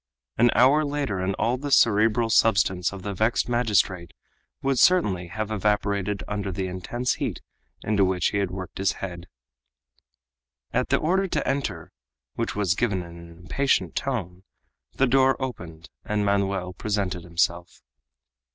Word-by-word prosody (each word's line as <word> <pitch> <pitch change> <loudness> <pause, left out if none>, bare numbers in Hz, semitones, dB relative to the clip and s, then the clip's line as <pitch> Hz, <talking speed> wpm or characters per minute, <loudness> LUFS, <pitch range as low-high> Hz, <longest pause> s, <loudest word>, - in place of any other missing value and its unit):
An 120 - +4
hour 135 +7 +5
later, 140 -9 -2
and 95 +1 -1
all 120 +2 0
the 145 +1 -4
cerebral 115 -2 +3
substance 95 -6 +3
of 100 -2 -9
the 100 0 -3
vexed 110 +5 +1
magistrate 100 -8 0 0.5
would 135 -2 +1
certainly 100 - +3
have 110 +3 -4
evaporated 100 -1 0
under 100 -2 -3
the 95 +1 -3
intense 95 +7 -2
heat - - -2 0.4
into 105 -2 +2
which 95 -1 +1
he 100 - -1
had 100 -2 0
worked 95 -1 -7
his 95 -1 +1
head. 90 -2 -7 1.5
At - - 0
the - - +3
order 190 +4 +1
to - - -2
enter 105 - -2 0.4
which - - -3
was 100 -4 +1
given 100 -3 -1
in 85 0 -11
an 85 0 -12
impatient 90 +11 -1
tone 95 -10 -3 0.5
the 135 - +2
door 135 +1 +3
opened 85 -11 -7
and 105 -1 -1
Manoel 100 -2 0
presented 100 -3 -2
himself. 85 +1 -2
100 Hz, 150 wpm, -25 LUFS, 90-120 Hz, 1.5 s, hour